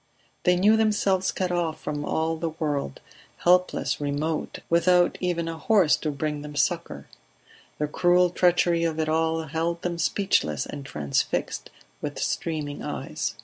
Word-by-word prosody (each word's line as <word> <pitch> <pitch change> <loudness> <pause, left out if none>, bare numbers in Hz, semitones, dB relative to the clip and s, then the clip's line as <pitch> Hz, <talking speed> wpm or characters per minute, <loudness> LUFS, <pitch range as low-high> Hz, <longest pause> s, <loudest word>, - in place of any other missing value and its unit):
They 180 -1 +5
knew 210 +5 +4
themselves 205 -4 +2
cut 185 -1 -2
off 170 -3 -1
from 145 -1 -4
all 160 +2 0
the 165 +1 -2
world, 145 - -3 0.4
helpless, 180 -3 +2
remote, 145 +2 -2
without 175 +1 +4
even 175 -2 -1
a 165 -1 -5
horse 185 -9 +4
to 155 - -3
bring 150 0 -3
them 150 0 -8
succour. 145 - -1 0.7
The 150 - 0
cruel 175 +3 +3
treachery 175 -1 +3
of 160 -1 -1
it 160 - 0
all 160 +1 +1
held 165 +2 -2
them 175 -1 -2
speechless 160 - +1
and 145 -1 -7
transfixed, 75 - -2 0.3
with - - -4
streaming 150 -3 -3
eyes. - - -4
165 Hz, 145 wpm, -25 LUFS, 150-180 Hz, 0.7 s, They